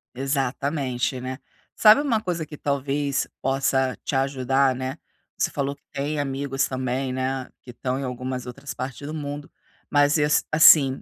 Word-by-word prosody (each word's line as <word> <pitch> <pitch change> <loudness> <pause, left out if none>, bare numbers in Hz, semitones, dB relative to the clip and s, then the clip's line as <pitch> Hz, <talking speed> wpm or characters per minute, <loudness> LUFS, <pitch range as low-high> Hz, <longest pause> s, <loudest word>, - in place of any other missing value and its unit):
Exatamente, 135 -1 -1
né. 130 +1 -5 0.4
Sabe, 215 +5 +7
uma 240 -7 +1
coisa 175 -5 -2
que 150 0 -10
talvez 140 0 -1
possa 135 -1 +1
te - - -2
ajudar, 135 0 +2
né, 130 +3 -4 0.4
você - - +1
falou 140 -1 -2
que - - -38
tem 145 +2 -2
amigos, 135 -1 -1
também, 130 0 -2
né, 130 0 -2
que 125 - -11
estão 125 +1 -3
em - - -4
algumas 125 0 -4
outras 135 +2 -7
partes 130 +1 -6
do 155 - -5
mundo, 145 -1 -5 0.4
mas, 145 +1 +4
eh, 150 -1 +3 0.2
assim, 150 -4 +7
135 Hz, 160 wpm, -24 LUFS, 130-145 Hz, 0.4 s, Sabe